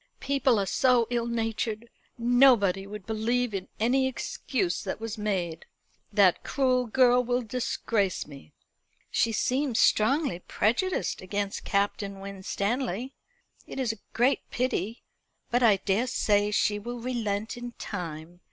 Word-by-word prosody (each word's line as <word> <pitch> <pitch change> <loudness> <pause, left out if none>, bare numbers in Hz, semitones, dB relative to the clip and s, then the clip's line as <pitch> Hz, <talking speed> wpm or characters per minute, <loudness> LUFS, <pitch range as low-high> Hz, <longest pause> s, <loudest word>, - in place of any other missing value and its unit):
"People 270 -4 +2
are 200 - +1
so 245 +4 +3
ill 235 -1 0
natured. 225 -1 -2 0.3
Nobody 235 -6 +4
would 210 -1 -8
believe 225 +2 0
in 195 -2 -4
any 260 +4 +3
excuse 220 -6 -2
that - - -4
was 225 -1 -4
made. 185 -6 -3 0.4
That 200 -4 +4
cruel 255 -3 +1
girl 250 +1 +4
will 245 +1 0
disgrace 220 -4 -1
me." 140 - -13 0.6
"She 230 - +2
seems 255 +2 0
strongly 260 - +3
prejudiced 240 - 0
against 200 +1 -3
Captain 200 0 -1
Winstanley. 200 +5 -3 0.5
It - - -6
is 245 -4 0
a 225 - -15
great 250 +4 +2
pity. 235 -3 -2 0.5
But 245 +1 +2
I 225 -4 +6
daresay 205 0 +1
she 210 0 +1
will 240 +3 -6
relent 225 -4 -2
in 240 0 -7
time. 170 -4 -7
225 Hz, 130 wpm, -27 LUFS, 200-245 Hz, 0.6 s, I